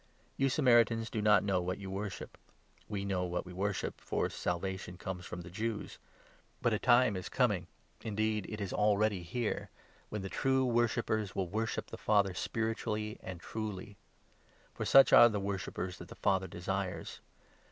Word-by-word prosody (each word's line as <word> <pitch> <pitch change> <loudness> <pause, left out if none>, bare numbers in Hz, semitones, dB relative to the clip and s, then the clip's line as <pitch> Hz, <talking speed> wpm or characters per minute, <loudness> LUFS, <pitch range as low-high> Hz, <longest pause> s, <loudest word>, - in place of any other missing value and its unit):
You 135 0 +2
Samaritans 120 -4 +3
do 110 - -1
not 105 0 +5
know 95 -2 +1
what 90 +1 -1
22 - - -13
you 95 - -5
worship; 100 +1 -5 0.5
we 100 -2 -3
know 95 -2 0
what 90 +1 -3
we 90 - -9
worship, 100 +2 -2
for - - -1
Salvation 90 0 -3
comes 90 -1 -6
from 90 - -6
the 85 0 -10
Jews. 110 +2 -4 0.6
But 120 - +1
a 105 - +1
time 120 -3 +4
is 95 - -5
coming, 105 -9 +1 0.4
indeed 110 -1 -1
it 110 - -5
is 100 -3 -3
already 105 0 +2
23 85 +8 -6
here, 110 - -2 0.4
when 105 -2 -4
the - - -3
true 130 +5 +1
worshippers 115 -4 0
will 95 -3 -1
worship 110 +3 -2
the - - -6
Father 100 -3 +3
spiritually 110 +1 -2
and 95 -2 -7
truly; 105 0 -5 0.8
for - - -4
such 135 - +7
are 120 - +10
the 105 -2 -2
worshippers 95 -2 -4
that - - -9
the - - -11
Father 95 -1 +1
desires. 95 +1 -4
105 Hz, 175 wpm, -33 LUFS, 95-110 Hz, 0.8 s, are